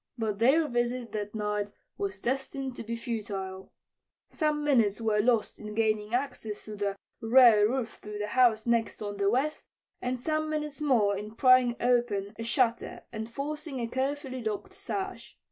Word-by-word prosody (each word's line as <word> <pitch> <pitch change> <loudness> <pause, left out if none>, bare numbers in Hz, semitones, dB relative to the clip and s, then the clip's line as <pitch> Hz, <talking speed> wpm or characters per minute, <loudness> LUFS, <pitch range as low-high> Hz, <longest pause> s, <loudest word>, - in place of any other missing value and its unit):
But 215 -3 -2
their 285 +7 +4
visit 240 -1 -1
that 210 0 -4
night 210 -1 -1 0.2
was 195 -1 -3
destined 265 +2 -2
to - - -6
be 230 +1 -3
futile. 200 -5 -5 0.6
Some 300 -1 0
minutes 235 -9 +3
were 220 -2 +1
lost 230 0 +2
in 210 0 -7
gaining 215 0 +1
access 250 -5 -3
to 215 - -7
the 200 -1 -1 0.3
rear 225 -3 +7
roof 245 -3 -3
through 210 0 -7
the 210 0 -3
house 230 -3 +4
next 230 -2 0
on 205 -1 -4
the 200 0 +2
west, 275 +7 0 0.3
and 250 0 -2
some 310 +3 -1
minutes 300 -2 -3
more 230 -9 +3
in 210 +2 -7
prying 255 -1 +5
open 235 -5 +1
a - - -3
shutter 235 0 0
and 220 0 -5
forcing 295 +1 -4
a 235 - -1
carefully 260 0 -2
locked 215 -2 -3
sash. 385 -1 -5
235 Hz, 165 wpm, -29 LUFS, 210-260 Hz, 0.6 s, rear